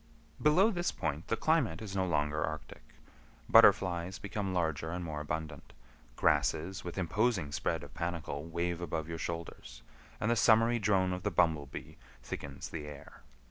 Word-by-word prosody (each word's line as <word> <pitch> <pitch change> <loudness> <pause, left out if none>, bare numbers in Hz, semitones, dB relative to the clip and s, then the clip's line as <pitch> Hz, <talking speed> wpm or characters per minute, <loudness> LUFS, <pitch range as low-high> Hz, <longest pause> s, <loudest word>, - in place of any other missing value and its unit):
Below 180 +9 +5
this 175 -3 -1
point 75 +1 -3
the 115 - 0
climate 130 - +2
is 100 -3 -6
no 95 -1 +1
longer 75 -2 0
arctic. 80 0 -5 0.7
Butterflies 90 0 +5
become 100 -1 -3
larger 80 -3 -1
and 90 +1 -4
more 75 -2 -4
abundant, 75 -1 -5 0.4
grasses 80 +9 +1
with 90 +1 -6
imposing 95 -2 +1
spread 80 0 -1
of 70 - -11
panicle 85 -4 -3
wave 85 +1 -2
above 80 -2 -3
your 85 -1 -5
shoulders, 85 -8 -6 0.4
and 105 - +1
the - - +3
summery 115 +2 +4
drone 95 -3 +2
of 90 - -4
the 105 - 0
bumblebee 80 -6 0 0.3
thickens 70 -1 -6
the 75 -3 -6
air. 75 -1 -11
85 Hz, 155 wpm, -32 LUFS, 75-100 Hz, 0.7 s, Below